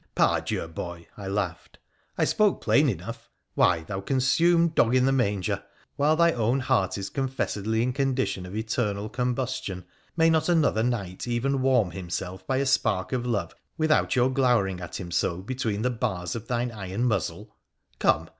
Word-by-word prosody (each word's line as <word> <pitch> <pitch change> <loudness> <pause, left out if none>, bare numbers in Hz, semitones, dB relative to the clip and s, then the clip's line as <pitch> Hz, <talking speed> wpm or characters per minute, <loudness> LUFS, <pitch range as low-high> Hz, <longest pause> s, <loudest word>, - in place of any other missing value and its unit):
' - - -47
Par - - +3
Dieu, - - -3
boy! 85 +1 -7
' - - -32
I 100 -2 -7
laughed. 95 -4 -3 0.2
' - - -41
I - - +3
spoke 210 -2 +2
plain 145 0 +3
enough! 105 +3 -6 0.2
Why, 85 -2 +3
thou 95 +4 -5
consumed 165 - +3
dog 120 -4 +3
in 130 0 +4
the 135 - +3
manger, 100 -5 0 0.3
while 150 +2 +3
thy 170 +1 +4
own 120 0 +1
heart 125 -9 +1
is 100 -1 -4
confessedly 115 -5 -1
in 125 +1 0
condition 130 -8 -1
of 95 - -8
eternal 110 -2 -2
combustion, 125 -5 -2 0.3
may 165 0 +5
not 160 +1 +2
another 155 -10 +3
knight 110 -5 -2
even 130 +3 0
warm 125 -8 +3
himself 90 +1 -5
by 130 - +1
a 140 - +1
spark 95 -8 +1
of 125 -1 -1
love 110 -5 -1 0.2
without 155 -3 +2
your 130 +1 +3
glowering 115 -9 +2
at 85 - -6
him 90 -3 -7
so 85 0 0
between 110 -3 -2
the 125 - +1
bars 95 -8 -2
of 115 -1 -6
thine 120 0 -1
iron 100 +1 -4
muzzle? 110 -8 -2 0.4
Come - - +2
120 Hz, 185 wpm, -26 LUFS, 95-130 Hz, 0.4 s, may